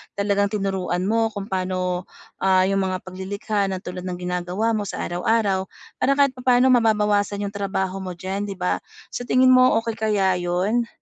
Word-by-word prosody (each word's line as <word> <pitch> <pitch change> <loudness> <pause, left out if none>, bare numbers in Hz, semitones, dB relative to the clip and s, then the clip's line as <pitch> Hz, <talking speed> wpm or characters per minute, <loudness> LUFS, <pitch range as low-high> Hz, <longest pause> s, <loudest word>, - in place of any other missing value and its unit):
talagang 200 0 +1
tinuruan 195 -3 -2
mo 225 +3 +2
kung 200 +1 -6
paano 185 -1 -2 0.3
ah, 190 -1 +4
yung 195 +1 +1
mga 185 -1 -2
pag-lilikha 200 +2 -3
ng 190 -1 -4
tulad 180 0 -6
ng 180 - -3
ginagawa 180 +4 -2
mo 210 -2 -1
sa - - -4
araw-araw 190 +1 0 0.3
para 275 +2 +3
kahit 280 -1 +4
pa-paano 250 +1 +4
mababawasan 210 -3 +2
yung 200 - -3
trabaho 195 -1 -2
mo 185 -2 -6
diyan 195 +3 -4
'di 200 - -5
ba? 180 -1 -1 0.3
Sa 245 - -5
tingin 255 0 +5
mo 255 -1 +6
okey 230 -1 -4
kaya 195 -4 +1
yun? 185 +7 0
195 Hz, 175 wpm, -23 LUFS, 185-220 Hz, 0.3 s, mo